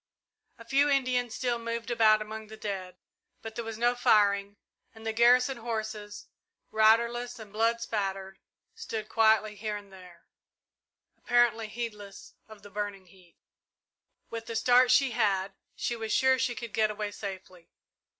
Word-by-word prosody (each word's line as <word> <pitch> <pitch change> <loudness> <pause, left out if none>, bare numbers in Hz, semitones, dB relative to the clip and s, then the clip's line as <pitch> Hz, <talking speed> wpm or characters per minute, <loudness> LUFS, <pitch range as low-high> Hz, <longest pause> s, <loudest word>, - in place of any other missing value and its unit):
A 230 - -13
few 275 +5 +3
Indians 250 -4 0
still 245 -2 -1
moved 230 +1 -4
about 215 -2 +4
among 220 0 -8
the 220 +1 -11
dead, 190 -4 -5 0.5
but 225 - -7
there 235 - -4
was 225 -1 -6
no 240 +1 +2
firing, 205 -4 +2 0.4
and 220 0 -13
the 225 - -1
garrison 250 +3 +4
horses, 220 -3 -5 0.5
riderless 235 +3 +3
and 215 -3 -12
blood 230 +2 +1
spattered, 195 -4 -3 0.3
stood 225 - -6
quietly 220 -1 +3
here 210 0 -4
and 200 -1 -13
there, 180 -2 -15 1.0
apparently 240 -2 +2
heedless 210 -3 -7
of 215 -2 -14
the 205 - -13
burning 205 -1 -5
heat. 180 -1 -22 0.9
With 230 -1 -6
the 230 - -5
start 245 +2 +4
she 255 +1 +4
had, 200 -4 0 0.2
she 240 - -2
was 220 -1 -5
sure 260 +2 +3
she 250 -2 0
could 235 -3 -7
get 215 -1 +2
away 210 -1 -4
safely. 190 -4 -9
220 Hz, 150 wpm, -29 LUFS, 205-235 Hz, 1.0 s, about